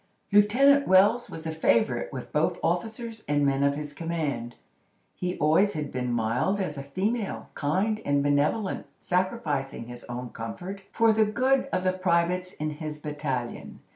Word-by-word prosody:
Lieutenant 265 Hz, +8 st, +5 dB
Wells 205 Hz, +6 st, +5 dB
was 160 Hz, -, -8 dB
a 160 Hz, -, -2 dB
favorite 220 Hz, -, +1 dB
with -, -, -7 dB
both -, -, +1 dB
officers 225 Hz, 0 st, -2 dB
and 145 Hz, -1 st, +2 dB
men 135 Hz, 0 st, +2 dB
of 140 Hz, 0 st, +3 dB
his 150 Hz, 0 st, -6 dB
command. 150 Hz, -8 st, -3 dB, 0.6 s
He 180 Hz, 0 st, -3 dB
always 160 Hz, +7 st, +3 dB
had 150 Hz, -2 st, -4 dB
been 125 Hz, -1 st, -2 dB
mild 120 Hz, -, 0 dB
as 170 Hz, -6 st, -2 dB
a 140 Hz, -, -5 dB
female, 195 Hz, -, -2 dB
kind 195 Hz, +9 st, 0 dB
and 140 Hz, 0 st, +1 dB
benevolent—sacrificing 150 Hz, -, -1 dB
his 120 Hz, 0 st, -10 dB
own 120 Hz, 0 st, -5 dB
comfort 180 Hz, -, -6 dB
for 230 Hz, -1 st, +4 dB
the 220 Hz, 0 st, +4 dB
good 260 Hz, +5 st, +1 dB
of 185 Hz, -, 0 dB
the 185 Hz, 0 st, +2 dB
privates 180 Hz, 0 st, +1 dB
in 155 Hz, 0 st, -3 dB
his 150 Hz, 0 st, -6 dB
battalion. 145 Hz, -5 st, -4 dB
170 Hz, 155 wpm, -27 LUFS, 145-205 Hz, 0.6 s, Lieutenant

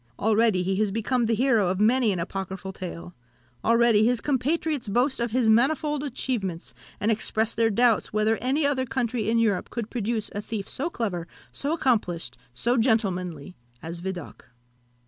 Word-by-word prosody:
Already 220 Hz, -3 st, +2 dB
he 190 Hz, +1 st, -1 dB
has 215 Hz, 0 st, +1 dB
become 225 Hz, +3 st, 0 dB
the 225 Hz, -, +2 dB
hero 235 Hz, -5 st, +3 dB
of 185 Hz, +1 st, -1 dB
many 230 Hz, +1 st, +4 dB
an 185 Hz, -, -1 dB
apocryphal 190 Hz, +2 st, -5 dB
tale 175 Hz, -1 st, -7 dB, 0.5 s
already 230 Hz, -2 st, +4 dB
his 240 Hz, +1 st, +2 dB
compatriots 290 Hz, +1 st, -1 dB
boast 250 Hz, +7 st, +1 dB
of 235 Hz, 0 st, 0 dB
his 240 Hz, 0 st, +1 dB
manifold 285 Hz, +6 st, +2 dB
achievements, 230 Hz, -, -3 dB, 0.3 s
and 215 Hz, +3 st, +1 dB
express 220 Hz, +1 st, 0 dB
their 225 Hz, 0 st, +2 dB
doubts 230 Hz, +1 st, +2 dB
whether 215 Hz, +1 st, +2 dB
any 275 Hz, +5 st, 0 dB
other 260 Hz, -2 st, 0 dB
country 235 Hz, -4 st, -1 dB
in 230 Hz, -, +2 dB
Europe 210 Hz, -5 st, +1 dB
could 230 Hz, -2 st, -5 dB
produce 225 Hz, -2 st, -2 dB
a 205 Hz, -, -3 dB
thief 210 Hz, -2 st, -5 dB
so 295 Hz, +6 st, -2 dB
clever, 195 Hz, -, -3 dB, 0.2 s
so 285 Hz, -, -3 dB
accomplished, 210 Hz, -, 0 dB, 0.2 s
so 235 Hz, -, 0 dB
gentlemanly, 185 Hz, -, 0 dB, 0.3 s
as 165 Hz, +1 st, -6 dB
Vidocq. 180 Hz, -2 st, -6 dB
225 Hz, 165 wpm, -25 LUFS, 195-250 Hz, 0.5 s, many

